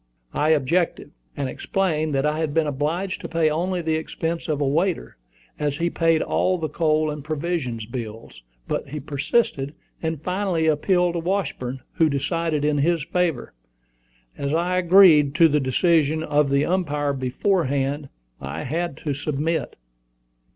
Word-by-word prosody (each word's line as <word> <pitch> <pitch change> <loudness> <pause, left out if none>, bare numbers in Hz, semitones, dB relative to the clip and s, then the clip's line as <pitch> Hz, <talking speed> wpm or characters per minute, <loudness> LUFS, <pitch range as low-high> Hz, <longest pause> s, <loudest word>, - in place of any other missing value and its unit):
I 150 - +1
objected, 160 +3 +1 0.3
and 140 - -1
explained 155 0 -1
that 135 +1 +1
I 150 +1 0
had 155 -2 -2
been 160 -1 +3
obliged 155 +7 -2
to - - -6
pay 165 -2 +2
only 175 +3 -1
the 160 -1 +1
expense 165 +1 -3
of 150 -3 -1
a 145 - +1
waiter, 170 +5 0 0.4
as 145 -1 -1
he 170 +2 0
paid 165 -1 +2
all 185 0 +1
the 160 -2 -3
coal 155 -2 +1
and 150 -1 -6
provision 155 -5 -2
bills, 115 - -7 0.3
but - - -3
he 150 +2 -5
persisted, 145 - -1 0.3
and 160 -2 -2
finally 180 0 -1
appealed 175 +3 +2
to 170 - -1
Washburn, 165 -8 -2
who 160 -1 +2
decided 150 +1 -1
in 150 -1 +1
his 165 +1 +2
favor. 170 -4 -1 0.8
As 140 +2 -2
I 180 +2 +1
agreed 170 -6 +6
to 165 +1 +7
the 150 -1 +2
decision 155 +3 +2
of 150 -2 +2
the 140 +1 +2
umpire 150 -6 0
beforehand, 140 0 0 0.3
I 70 +4 -5
had 165 +2 -2
to 145 - 0
submit. 150 +3 -2
155 Hz, 155 wpm, -23 LUFS, 140-170 Hz, 0.8 s, to